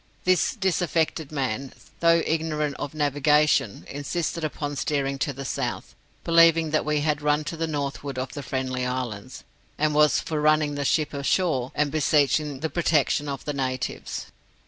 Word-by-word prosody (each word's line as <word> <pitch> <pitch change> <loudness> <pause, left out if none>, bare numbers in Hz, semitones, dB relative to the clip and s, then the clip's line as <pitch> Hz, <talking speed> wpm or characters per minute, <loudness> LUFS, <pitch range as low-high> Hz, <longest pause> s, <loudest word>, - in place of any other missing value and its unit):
This 185 -1 +2
disaffected 170 - 0
man, 135 -2 -3 0.3
though 170 -1 +4
ignorant 155 -2 -1
of 145 +1 -5
navigation, 145 -5 +2
insisted 160 +4 -3
upon 145 -1 -3
steering 140 -1 -1
to 145 - 0
the 135 0 -7
south, - - -3 0.3
believing 165 -1 +5
that 155 - +2
we 150 -1 0
had 150 0 0
run 150 +1 +2
to 165 +2 -5
the 165 0 -2
northward 140 -2 -4
of 130 +1 -3
the 145 - -5
Friendly 130 -1 -3
Islands, 125 -1 -4 0.3
and 150 0 +1
was 150 0 +4
for 155 -2 -3
running 155 -1 +3
the 145 -1 -3
ship 155 +1 +1
ashore 140 -2 0
and 145 -1 +1
beseeching 145 -2 +1
the 160 - 0
protection 150 -3 +1
of 140 -1 -5
the 150 - -2
natives. 130 -2 -3
150 Hz, 160 wpm, -25 LUFS, 140-155 Hz, 0.3 s, believing